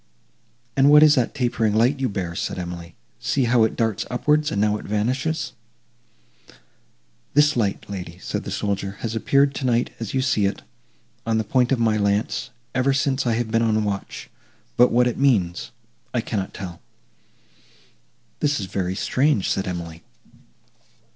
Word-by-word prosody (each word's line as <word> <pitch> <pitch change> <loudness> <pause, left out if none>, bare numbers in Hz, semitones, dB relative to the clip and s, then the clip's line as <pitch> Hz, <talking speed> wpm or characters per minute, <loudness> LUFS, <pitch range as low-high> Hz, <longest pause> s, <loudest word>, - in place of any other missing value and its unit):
"And 140 +1 +5
what 150 +1 +8
is 150 -1 +7
that 125 -3 0
tapering 120 -5 0
light 125 +6 +3
you 130 -2 0
bear?" 90 -4 -3
said 85 - -3
Emily, 85 -2 -7 0.2
"see 135 - 0
how 120 -1 +4
it 110 - -2
darts 110 -4 0
upwards,—and 150 -2 +1
now 105 0 +2
it - - -10
vanishes!" 130 +10 -1 1.8
"This 150 +1 +5
light, 105 -5 -1
lady," 90 -3 -7
said 90 - -4
the - - -6
soldier, 100 -1 -2
"has 115 -1 -3
appeared 140 +4 +3
tonight 125 -3 0
as 115 +2 -5
you 130 - +1
see 110 -6 +2
it, 100 - -4 0.6
on 115 -1 0
the 110 - +1
point 125 +3 +1
of 135 - +3
my 110 -2 +2
lance, 100 +5 0 0.2
ever 130 +2 +2
since 135 -1 0
I 115 - +2
have 115 -1 -2
been 115 0 +2
on 110 -1 +2
watch; 100 -2 -4 0.5
but 125 +1 +5
what 125 +1 +4
it 125 - -1
means 100 -11 +1 0.5
I 120 - +2
cannot 100 -4 -3
tell." 90 -3 -8 1.6
"This 145 -3 +1
is 100 - -3
very 95 -1 -2
strange!" 130 -1 +1
said 95 - -1
Emily. 85 -2 -5
115 Hz, 160 wpm, -23 LUFS, 100-130 Hz, 1.8 s, what